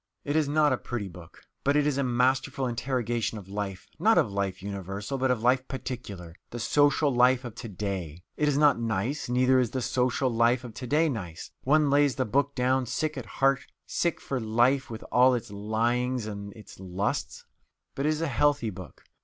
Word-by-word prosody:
It 145 - -2
is 155 -2 +2
not 150 -2 +3
a 125 - -2
pretty 120 -5 -4
book, 85 -2 -13 0.2
but 140 +1 +2
it 150 -1 +3
is 145 -2 +1
a - - +2
masterful 130 +2 +1
interrogation 120 -2 -1
of 100 -3 -10
life 100 -2 -5
not - - +4
of - - +3
life 100 -1 -2
universal, 100 +6 -4
but 130 0 +1
of 120 -3 0
life 130 +1 +3
particular, 115 -10 -6 0.2
the 120 - -7
social 145 +3 +3
life 125 +1 +4
of 120 - -6
to 115 +1 -8
day. 90 -5 -5
It 150 - +1
is 145 -1 +2
not 145 -4 +4
nice; 115 +5 -2
neither 130 +1 +4
is 125 -3 +1
the 130 - -3
social 125 +1 +1
life 120 +2 +3
of 120 -3 -8
to 125 +3 -7
day 155 +5 +3
nice. 90 - -5
One 150 +1 +4
lays 145 -3 +4
the - - 0
book 140 +5 0
down 130 0 +1
sick 155 +5 -2
at 130 -4 -6
heart 135 -1 +2 0.3
sick 170 -2 -1
for 135 - -3
life 120 +4 +2
with 110 -1 -7
all 125 +1 +5
its 115 -2 -5
"lyings 115 +4 0
and 100 -1 -6
its 110 -5 -14
lusts." 95 +2 -3 0.5
But 140 +2 -1
it - - +3
is 155 0 -1
a 165 - 0
healthy 145 -3 +1
book. 95 -1 -11
125 Hz, 205 wpm, -27 LUFS, 105-135 Hz, 0.5 s, all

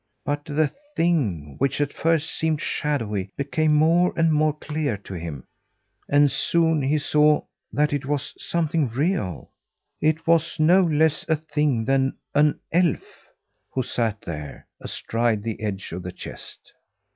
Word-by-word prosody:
But 145 0 -2
the 150 -1 +1 0.2
thing, 105 - 0
which 135 +1 +1
at 145 -1 0
first 165 -1 +1
seemed 160 -1 0
shadowy, 110 -14 -2
became 150 +2 +1
more 165 +4 +4
and 165 -1 +3
more 155 0 +3
clear 150 -7 -2
to 100 -1 -10
him; 80 -7 -6 0.7
and 145 -1 +5
soon 160 +2 +2
he 140 +3 +2
saw 150 0 +3 0.3
that 150 0 +1
it 140 -2 -2
was 145 0 -2
something 160 -3 0
real. 130 - -2 0.5
It 155 +1 +1
was 165 0 +2
no 175 +5 +6
less 160 -3 +2
a 160 - +4
thing 150 -6 0
than 135 +1 +2 0.2
an 150 +1 +3
elf 170 -4 +2 0.7
who 130 - -1
sat 115 -3 -1
there 75 -4 -7
astride 115 -2 -1
the 110 -1 -4
edge 100 -3 -4
of 90 +2 -5
the 90 +1 -6
chest! - - -11
145 Hz, 145 wpm, -24 LUFS, 115-155 Hz, 0.7 s, no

